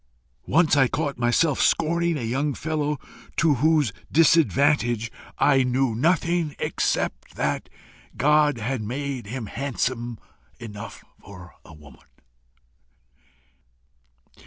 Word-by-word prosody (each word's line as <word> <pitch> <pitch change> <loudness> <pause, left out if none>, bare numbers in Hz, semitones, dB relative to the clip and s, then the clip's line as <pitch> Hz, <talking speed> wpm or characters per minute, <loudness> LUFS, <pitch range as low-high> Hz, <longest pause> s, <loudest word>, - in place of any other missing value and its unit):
Once 160 0 +3
I 135 -2 +4
caught 145 0 -3
myself 125 +5 +2
scorning 170 0 +1
a 130 - -5
young 135 +5 -1
fellow 150 -2 -2 0.4
to 165 -3 +4
whose 150 -8 +3 0.2
disadvantage 140 -7 +3 0.3
I 140 -2 +4
knew 130 -1 +1
nothing, 165 +3 +1
except - - -2
that - - -2 0.5
God 150 0 +3
had 115 +2 -3
made 130 +1 -4
him 120 +1 -5
handsome 120 -1 -3 0.4
enough 105 -2 -9 0.2
for 90 -2 -12
a 80 - -14
woman. 75 -4 -17
135 Hz, 105 wpm, -24 LUFS, 115-150 Hz, 0.5 s, I